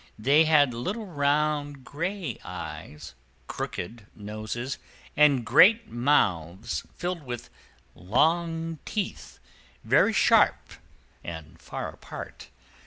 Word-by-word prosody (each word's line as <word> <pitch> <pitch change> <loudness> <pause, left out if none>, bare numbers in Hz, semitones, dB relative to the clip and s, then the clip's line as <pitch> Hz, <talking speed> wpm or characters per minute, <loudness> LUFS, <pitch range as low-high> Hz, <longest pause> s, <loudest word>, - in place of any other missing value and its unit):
They 140 +8 +4
had 145 -5 +4
little 195 - -4
round 145 -3 0
gray 170 - -4
eyes, 75 +1 -8 0.3
crooked 105 +3 -6
noses, 110 +5 -5 0.4
and 140 -5 +4
great 210 - +5
mouths 105 - 0
filled 175 -1 -3
with 120 -3 -7 0.4
long 165 - 0
teeth, 205 -3 -4 0.5
very - - +4
sharp - - +4 0.7
and 80 -3 -9
far - - -5
apart. - - -10
140 Hz, 95 wpm, -27 LUFS, 110-165 Hz, 0.7 s, great